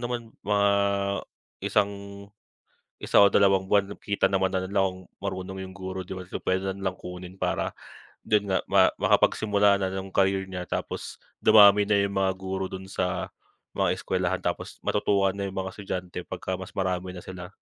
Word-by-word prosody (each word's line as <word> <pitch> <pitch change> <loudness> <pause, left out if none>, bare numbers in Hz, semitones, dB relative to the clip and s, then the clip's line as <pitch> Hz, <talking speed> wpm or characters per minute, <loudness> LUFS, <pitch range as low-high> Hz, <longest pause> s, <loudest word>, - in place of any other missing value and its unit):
naman 120 -2 -4
mga 100 0 +2 0.9
isang 100 0 +1 1.1
isa - - +4
o 100 - +8
dalawang 95 -1 +3
buwan, 100 0 +2
kita 100 0 0
naman 95 -1 +2
na 95 -1 -1
nila 100 +1 +1
kung 95 -1 -2 0.2
marunong 95 -1 -4
yung 95 - -7
guro, 95 -1 -5
di 95 +1 -7
ba? 95 - -7
So, 90 - -6
pwede 95 +1 0
na 95 - -1
nilang 95 -1 -3
kunin 90 +1 -9
para - - -1 0.5
dun 105 -1 +1
nga 95 -1 +1
ma - - +6 0.2
makapagsimula 100 -2 +3
na 95 - 0
ng 95 0 -6
career 95 0 +2
niya. 90 -1 -5
Tapos - - -4 0.3
dumami 105 -1 +8
na 105 - +4
yung 100 - -6
mga 95 -1 +2
guro 95 0 -3
dun 95 0 -7
sa 95 -1 -2 0.5
mga - - +1
eskuwelahan. - - -1
Tapos - - -3
matutuwa 100 -1 +2
na 100 - -4
yung 95 - -6
mga 95 0 -3
estudyante 95 -3 -5
pagka 95 - -5
mas 95 0 -7
marami 95 -1 -2
na 90 - -8
sila. 90 -1 -8
95 Hz, 175 wpm, -26 LUFS, 95-100 Hz, 1.1 s, o